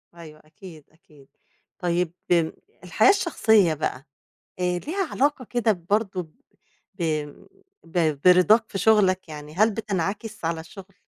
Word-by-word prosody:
أيوه 155 -2 -13
أكيد، 155 -1 -14
أكيد. 150 -3 -22 0.5
طيب 175 -1 -1 0.2
امم 165 -2 +3 0.3
الحياة 180 - +3
الشخصية 220 - +3
بقى، 145 -3 -4 0.5
آآ، 180 0 0
ليها 345 - -3
علاقة 280 -2 0
كده 235 -2 +1 0.2
برضو 200 -3 0 0.7
ب 185 -2 -6 0.8
ب 160 -4 -1
برضاك 185 +5 +6
في - - -3
شغلك، 190 -4 +2
يعني 150 0 -9
هل 215 +4 +3
بتنعكس 210 -1 -4
على 165 0 -1
الشغل؟ 195 +3 -13
180 Hz, 125 wpm, -24 LUFS, 160-215 Hz, 0.8 s, برضاك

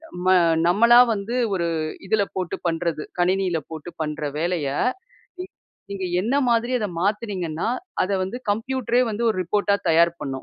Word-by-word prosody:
நம்ம 180 +1 +1 0.3
நம்மளா 230 +7 +5
வந்து 220 +3 -3 0.2
ஒரு 170 -2 0 0.4
இதுல 205 +1 +2
போட்டு 185 -2 -2
பண்றது. 165 -2 -1 0.2
கணினில 185 -1 +1
போட்டு 160 +2 -7
பண்ற 150 0 -3
வேலைய, 170 -3 -1 1.2
நீங்க 190 -2 -3 0.2
என்ன 240 +7 0
மாதிரி 235 +2 +1
அத 210 - -1
மாத்துனீங்கன்னா, 195 -5 -2 0.4
அத 185 - -3
வந்து 195 +7 -4
கம்ப்யூட்ரே 245 +2 0
வந்து 215 +3 -3
ஒரு 185 - -7
ரிப்போர்ட்டா 200 +2 +1
தயார் 170 +1 +4
பண்ணும். 135 - -5
190 Hz, 140 wpm, -23 LUFS, 170-220 Hz, 1.2 s, நம்மளா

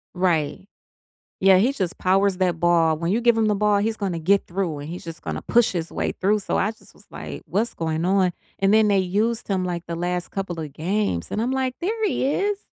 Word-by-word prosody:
Right. 180 -1 0 0.7
Yeah, 190 -1 +6
he 235 +8 +3
just 190 -10 -3
powers 195 +1 +2
that 180 -3 0
ball. 165 -2 +3
When 170 +1 -1
you 220 +5 +1
give 235 -1 +4
him 225 - +2
the 210 - +2
ball, 210 0 +2
he's 220 +2 0
gonna 190 -5 -2
get 195 +5 +2
through 175 -4 -2
and 145 - -7
he's 175 +2 -7
just 165 -1 -8
gonna - - -4
push 240 -3 +3
his 170 -2 -3
way - - -2
through. 205 +3 +1
So, - - -1
I 205 - +1
just 220 - -15
was - - -20
like, - - -8
"What's 225 +4 -1
going 160 0 -2
on?" 185 -1 +2 0.3
And 195 +1 +3
then 220 -1 +5
they 200 -1 +3
used 215 +6 0
him, 190 -2 0
like, 175 -1 -4
the 170 0 -4
last 175 +1 -2
couple 180 -4 -4
of 150 -3 -6
games, 180 - -1
and 215 - -2
I'm 240 +3 0
like, 260 -1 -1
"There 440 +5 -1
he 365 - 0
is!" 400 +8 0
195 Hz, 235 wpm, -23 LUFS, 175-215 Hz, 0.7 s, Yeah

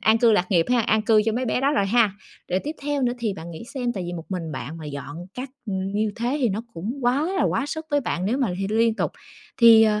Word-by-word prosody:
an 220 +1 +4
cư 230 -1 +5
lạc 185 -4 +1
nghiệp 170 -4 +3
ha, 250 -1 +4
an 220 -1 +2
cư 215 -1 +4
cho 225 - +1
mấy 250 +3 -1
bé 250 - 0
đó 275 +2 +2
rồi 200 -9 +2
ha. 225 0 +4 0.4
Rồi 180 - +2
tiếp 300 - -2
theo 290 -1 -1
nữa 245 -1 +2
thì 225 -4 -1
bạn 165 -1 -8
nghĩ 165 +6 -8
xem, 245 -2 -1
tại 195 -5 -4
vì 175 - -4
một 165 -2 -6
mình 170 -5 -4
bạn 145 +4 -6
mà 160 - -8
dọn 145 0 -7 0.2
các 255 +2 -5 0.2
ừm, 190 -2 -2
như 210 0 0
thế 245 +5 -1
thì 250 - +3
nó 205 +1 -2
cũng 200 +9 -4
quá 250 +4 +2
là - - +2
quá 275 - +1
sức 315 +2 -5
với 290 0 +3
bạn 185 -8 -2
nếu 240 +6 0
mà 260 -5 +1
thì 195 - -1
liên 225 +1 +3
tục. - - -1 0.4
Thì, 230 -2 +8
ờ, 210 -1 +3
220 Hz, 290 wpm, -24 LUFS, 190-245 Hz, 0.4 s, Thì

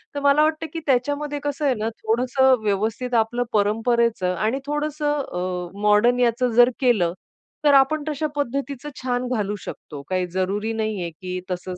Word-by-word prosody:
तर - - -1
मला 285 +2 +5
वाटतं, 315 +1 0
की 330 - -3
त्याच्यामध्ये 290 +3 0
कसं 290 +1 -2
आहे 260 -3 +3
ना 215 +1 -2
थोडसं 255 +3 +3
व्यवस्थित 220 +5 -1
आपलं 240 +2 -3
परंपरेच 225 +1 +1
आणि 215 +9 0
थोडसं 295 0 -1
अ, 180 0 -5
मॉडर्न 210 +4 +4
याच 240 +1 +2
जर 245 +1 +7
केलं, 210 -10 +2 0.5
तर 290 - +6
आपण 275 +3 +4
तश्या 305 0 -1
पद्धतीच 280 0 -3 0.2
छान 250 0 -1
घालू 210 -1 -1
शकतो. 145 -2 -8
काही 185 -1 0
जरुरी 200 +4 -1
नाहीये, 215 -6 -2
की 180 +3 -6
तसच 180 0 -4
240 Hz, 160 wpm, -23 LUFS, 205-280 Hz, 0.5 s, जर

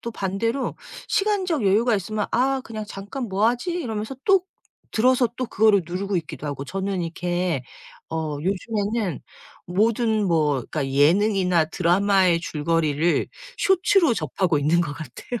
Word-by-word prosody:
또 235 - -5
반대로 220 +8 -2 0.3
시간적 375 - +1
여유가 220 +3 +3
있으면 210 +3 -3
아 265 +2 +1
그냥 215 -2 -6
'잠깐 205 +8 -6
뭐 200 +3 +2
하지?' 245 +9 -2
이러면서 230 -7 -3
또 390 -2 +4 0.5
들어서 250 +2 +3
또 255 - -2
그거를 210 -3 +3
누르고 190 +3 -2
있기도 155 -3 -7
하고 140 -1 -4
저는 190 +2 -3
이렇게 175 -3 -2 0.5
어 155 -2 -3
요즘에는 200 - -2 0.5
모든 220 +3 +1
뭐 155 -3 +2 0.2
그러니까 145 -4 -2
예능이나 180 +5 +3
드라마의 180 +2 +2
줄거리를 160 0 0 0.3
쇼츠로 380 - +3
접하고 180 -7 0
있는 155 +4 +2
것 155 -4 -2
같아요. 165 +9 -7
195 Hz, 320 characters per minute, -23 LUFS, 170-230 Hz, 0.5 s, 또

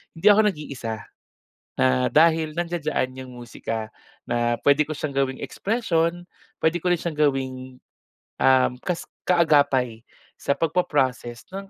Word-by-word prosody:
hindi 200 +6 +5
ako 210 +1 +5
nag-iisa, 125 - -4 0.8
na 65 -1 +2
dahil 160 0 +4
nandiyan-diyan 155 -6 -2
'yong 130 - -11
musika 115 -2 -5 0.4
na 120 0 0
puwede 145 +1 +4
ko 155 - -8
siyang 145 -2 -4
gawing 135 -1 0
expression, 175 -6 -1 0.3
puwede 165 +1 0
ko 180 - +2
rin 175 - +2
siyang 170 -3 -4 0.2
gawing, 130 -1 -6 0.6
um, 130 -1 +5
kas 180 -2 -3 0.2
kaagapay 145 -9 +2 0.3
sa 140 - -2
pagpa-process 140 -8 -1
ng 195 0 -7
145 Hz, 130 wpm, -24 LUFS, 130-170 Hz, 0.8 s, hindi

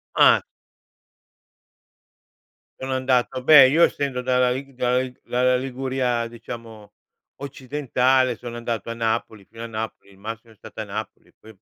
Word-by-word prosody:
Uhm. - - +6 2.4
Sono 130 0 -3
andato 130 -1 0
beh, 140 -2 +9
io 160 +5 +4
essendo 135 -3 0
dalla 125 0 +2
Lig 135 +2 -5
dalla 125 0 0
Lig 130 -1 -6
dalla 125 +1 +2
Liguria 130 -2 -2
diciamo, 115 -2 -10 0.4
occidentale 130 -2 0
sono 120 +2 -8
andato 115 -2 -4
a - - -2
Napoli, 110 -2 -2
fino 115 - -13
a 115 - -5
Napoli, 110 -2 -6
il 95 - -19
massimo 115 +2 -8
è - - -26
stato 110 - -9
a - - -3
Napoli, 105 +1 -7
poi 110 0 -15
125 Hz, 145 wpm, -23 LUFS, 115-130 Hz, 2.4 s, beh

